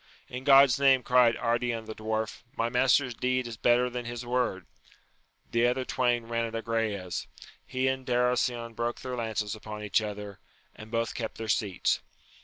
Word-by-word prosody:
In 125 +1 -7
God's 140 -1 +7
name, 135 -2 +5
cried 125 -2 +4
Ardian 120 -1 -1
the 110 - -6
Dwarf, 110 0 -3 0.2
my 115 +1 +1
master's 125 +1 +3
deed 130 +1 0
is 120 -1 -6
better 120 +3 +3
than 125 -1 -5
his 120 0 -5
word! 120 -7 -1 0.9
The 115 +1 +3
other 130 +1 0
twain 120 -2 0
ran 115 0 -1
at 115 0 -6
Agrayes: 115 -5 -2 0.4
he 130 0 0
and 130 0 -1
Darasion 125 -1 0
broke 120 +1 -2
their 130 -1 -4
lances 110 -3 -2
upon 105 -1 -7
each 105 +1 +2
other, 105 -1 -6 0.4
and 110 0 -11
both 115 0 -1
kept 115 -2 -5
their 115 - -5
seats. 105 -4 0
120 Hz, 170 wpm, -28 LUFS, 110-125 Hz, 0.9 s, God's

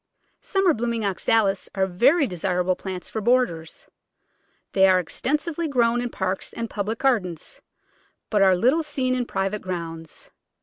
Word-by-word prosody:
Summer 390 -4 +2
blooming 230 -3 -2
Oxalis 200 0 +1
are 190 -1 +2
very 265 - +3
desirable 180 -2 0
plants 185 -1 -6
for 220 - -4
borders. 220 -9 0 0.9
They 190 -1 +5
are 185 -1 +5
extensively 300 - -2
grown 240 -4 +2
in 245 - -3
parks 190 -3 -3
and 230 0 -4
public 215 +2 -2
gardens, 205 - -1 0.7
but 210 -2 +2
are 190 -1 +6
little 255 - +3
seen 280 -4 -1
in 250 -1 -1
private 195 +2 -2
grounds. 165 -3 -7
210 Hz, 140 wpm, -24 LUFS, 185-255 Hz, 0.9 s, are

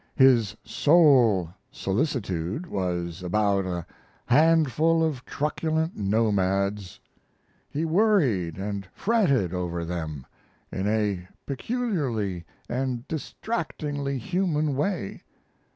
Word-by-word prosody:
His 125 -6 +5
sole 130 - +4 0.2
solicitude 100 - -2
was 90 - -3
about 100 +1 +1
a 85 -2 -3 0.4
handful 160 +3 +4
of 145 -6 -1
truculent 160 +2 -1
nomads. 100 -2 0 0.7
He 155 +3 -2
worried 155 - +2
and 100 0 -4
fretted 140 - +2
over 85 -2 -2
them 80 -5 -5 0.5
in 95 +2 -2
a 105 -4 0 0.2
peculiarly 135 - -2 0.2
and 125 0 -2
distractingly 150 -5 -3
human 155 - 0
way. 150 - -2
120 Hz, 90 wpm, -26 LUFS, 95-155 Hz, 0.7 s, His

